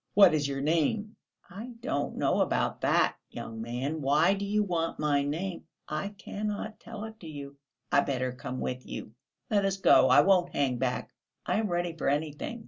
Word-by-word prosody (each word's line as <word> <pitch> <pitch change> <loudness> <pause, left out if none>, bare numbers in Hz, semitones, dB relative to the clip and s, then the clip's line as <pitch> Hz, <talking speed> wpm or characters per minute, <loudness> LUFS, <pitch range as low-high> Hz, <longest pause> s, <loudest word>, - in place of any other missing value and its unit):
What 195 -4 +8
is 150 -2 +1
your 135 -1 -3
name?" 170 +8 +1 0.3
"I 220 +7 -8
don't 145 - -2
know - - +2
about - - 0
that, - - +3
young 110 0 -7
man; 130 +7 -3
why 150 +7 +4
do 200 0 -3
you 210 +1 +2
want 170 -4 -1
my 145 -2 +2
name?... 170 +6 -3 0.2
I 155 +6 -2
cannot 210 +2 -4
tell 215 -2 -8
it 220 0 -9
you.... 140 -3 -8 0.3
I 140 - +5
better 130 -2 -1
come 125 0 -6
with 125 0 -3
you. 110 - -7 0.4
Let 205 -2 +3
us 195 0 0
go; 190 - +6
I - - +8
won't 180 -2 +3
hang 130 -4 +1
back; 125 0 -2 0.3
I - - +1
am 220 - 0
ready 175 -2 -1
for 160 - 0
anything.... 150 +10 -2
160 Hz, 185 wpm, -29 LUFS, 140-200 Hz, 0.4 s, What